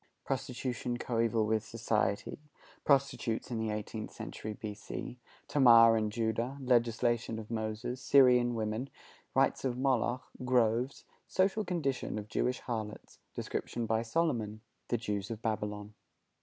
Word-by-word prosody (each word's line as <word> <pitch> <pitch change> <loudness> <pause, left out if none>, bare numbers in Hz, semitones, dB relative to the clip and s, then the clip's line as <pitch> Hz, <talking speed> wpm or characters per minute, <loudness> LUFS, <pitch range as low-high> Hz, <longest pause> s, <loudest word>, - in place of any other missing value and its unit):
Prostitution 125 -2 -2
coeval 115 -2 +1
with 110 0 +1
Society. 110 -2 -1 0.4
Prostitutes 135 -4 +1
in 115 - -1
the 110 0 -1
Eighteenth 105 +1 -4
Century 110 - -6
B.C. 105 +3 -6 0.3
Tamar 115 -5 +7
and 110 -1 0
Judah. 115 +4 -1
Legislation 120 -2 +1
of 110 0 -8
Moses. 110 +3 -3
Syrian 125 -3 +5
Women. 110 +4 -2 0.5
Rites - - +3
of 125 -2 -1
Moloch. 130 -1 +1 0.2
Groves. 125 0 +1 0.2
Social 195 +3 +2
Condition 155 - -2
of 105 0 -6
Jewish 125 +3 0
Harlots. 110 -3 -5 0.2
Description 120 -1 -3
by 110 0 +1
Solomon. 115 -5 -1 0.3
The 120 - +1
Jews 105 -3 -3
of 115 -1 -6
Babylon. 105 -1 -3
115 Hz, 125 wpm, -32 LUFS, 110-125 Hz, 0.5 s, Tamar